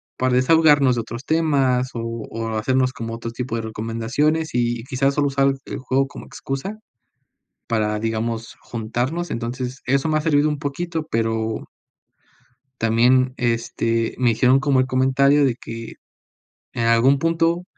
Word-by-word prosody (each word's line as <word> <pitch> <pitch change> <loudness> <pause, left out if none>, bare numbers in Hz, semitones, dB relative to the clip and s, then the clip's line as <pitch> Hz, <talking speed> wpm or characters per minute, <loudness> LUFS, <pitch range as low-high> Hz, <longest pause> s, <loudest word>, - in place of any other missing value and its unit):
para 130 -1 +1
desahogarnos 145 0 +5
de 120 - -1
otros 115 +4 -8
temas 140 -6 +2
o 115 - -3 0.3
o 115 0 -4
hacernos 130 +3 +1
como 115 0 -5
otro 115 0 -6
tipo 120 0 -4
de 115 - -3
recomendaciones, 115 +9 -1
y 120 -1 0
quizás 135 +2 0
solo 145 -1 +2
usar 140 0 +2
el - - -5
juego 135 +1 0
como - - -11
excusa 135 +11 -5 0.9
para, 105 -2 0
digamos, 115 +1 -3
juntarnos. 125 +9 -3
Entonces, 125 +3 -4
eso 135 +4 +1
me 155 - +1
ha - - +2
servido 150 -1 +3
un 150 - -1
poquito, 160 +2 -3
pero 110 -1 -1 1.1
también 125 +3 +3
este, 115 -1 -1
me 125 -2 +3
hicieron 125 +4 +4
como 140 -3 +2
el 130 - +1
comentario 135 +2 +3
de 130 -3 +2
que 115 -2 -8 0.8
en 115 - -2
algún 115 +4 +4
punto 165 +2 +1
130 Hz, 150 wpm, -21 LUFS, 115-140 Hz, 1.1 s, desahogarnos